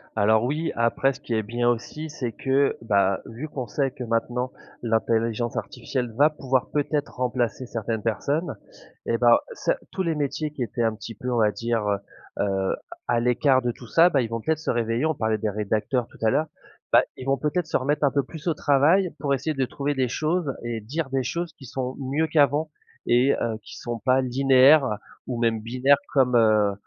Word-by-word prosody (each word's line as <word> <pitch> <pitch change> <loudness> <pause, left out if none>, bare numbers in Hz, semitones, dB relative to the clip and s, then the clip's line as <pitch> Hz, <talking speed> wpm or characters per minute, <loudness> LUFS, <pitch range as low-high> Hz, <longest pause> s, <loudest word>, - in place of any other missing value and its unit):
Alors 110 +1 +3
oui, 150 +6 -1
après 115 +4 +2
ce - - -13
qui - - -7
est 110 -1 +1
bien 120 +3 0
aussi 150 +7 -4
c'est 125 -5 -4
que, 135 +3 +1
bah, 100 -4 +2
vu 125 +7 -7
qu'on 130 -4 -5
sait 135 +5 -1
que 130 -2 -7
maintenant 120 +2 -1 0.3
l'intelligence 115 0 0
artificielle 125 0 -3
va 145 +7 +5
pouvoir 135 -4 -1
peut-être 145 0 -1
remplacer 125 -1 -1
certaines 115 -2 -3
personnes 140 - -1 0.5
et 115 - +1
bah, 120 0 +5
ce - - -1 0.2
tous 190 - -2
les 165 -3 0
métiers 150 +1 -2
qui 145 - -4
étaient 120 0 -2
un 115 -1 +1
petit 115 +1 -8
peu 125 +4 -4
on 120 - +1
va 105 -2 +4
dire, 115 +3 -1
heu 100 -1 +1 0.5
heu, 95 -1 0 0.3
à 120 -1 +2
l'écart 130 +2 +3
de 120 - 0
tout 120 - -13
ça, 165 +9 +5
bah, 140 - +2
ils 120 - -1
vont 115 0 -3
peut-être 160 +3 0
se 160 - -2
réveiller, 115 +3 0
on 160 - +1
parlait 110 -4 0
des 110 0 -1
rédacteurs 105 +4 -1
tout - - -18
à 110 - +3
l'heure, 155 +7 +1 0.5
bah, - - +8 0.2
ils 130 - -8
vont 135 0 +2
peut-être 155 +3 -1
se 160 - 0
remettre 145 +3 0
un 140 - +4
peu 140 - +1
plus 155 +5 -7
au 165 - +2
travail 155 +6 +3
pour 140 -1 -1
essayer 140 +4 -2
de 135 -2 0
trouver 140 +3 -2
des 130 -2 0
choses 155 +3 -1
et 115 -2 -4
dire 145 +7 -3
des 135 0 0
choses 170 +7 -3
qui 140 - -14
sont 130 0 -4
mieux 140 +4 0
qu'avant 150 0 +2 0.4
et, 125 +3 +4
heu, 115 -2 -1
qui 100 - -11
sont 120 -1 -4
pas 130 +3 +3
linéaires 135 +3 +5 0.4
ou 120 -2 -3
même 115 -2 +1
binaires 130 +5 +3 0.2
comme, 130 -3 +3
heu 110 -3 +4
125 Hz, 210 wpm, -25 LUFS, 115-145 Hz, 0.5 s, bah